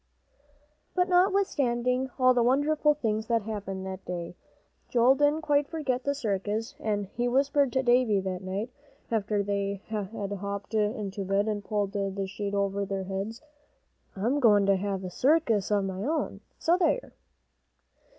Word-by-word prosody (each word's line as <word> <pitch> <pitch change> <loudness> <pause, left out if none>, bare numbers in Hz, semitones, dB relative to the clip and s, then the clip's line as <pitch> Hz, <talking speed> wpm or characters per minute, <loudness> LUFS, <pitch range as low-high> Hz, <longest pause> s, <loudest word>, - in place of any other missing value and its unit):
But 365 0 +2
notwithstanding 270 -10 +2
all 255 -1 +5
the 245 - +2
wonderful 295 +4 +3
things 220 -5 -1
that 230 -2 +1
happened 195 -3 -5
that 190 0 -6
day, 175 -1 -5 0.5
Joel 245 +2 +5
didn't 290 +3 +2
quite 290 -2 +2
forget 265 -6 -2
the 280 0 +1
circus, 215 -2 -2
and 205 -2 -1
he 240 +5 -2
whispered 275 +1 +2
to 265 0 +1
David 240 -5 +3
that 185 -1 -3
night, 195 +5 -4 0.4
after 210 -2 0
they 200 0 -2
had 210 -3 -2 0.3
hopped 200 +1 -5
into 210 -2 -1
bed, 195 +2 +1
and 210 -1 -2
pulled 205 -2 -1
the 195 -1 -2
sheet 200 +1 -4
over 200 0 0
their 195 -1 -3
heads, 195 +7 -5 0.7
"I'm 235 +9 0
goin' 210 -6 +5
to 195 0 +4
have 195 0 -2
a 180 - -5
circus 250 - +2
of 205 -2 +2
my 190 0 -4
own, 310 +5 -2 0.2
so 345 +2 +2
there!" 440 +8 +1
215 Hz, 155 wpm, -28 LUFS, 195-265 Hz, 0.7 s, all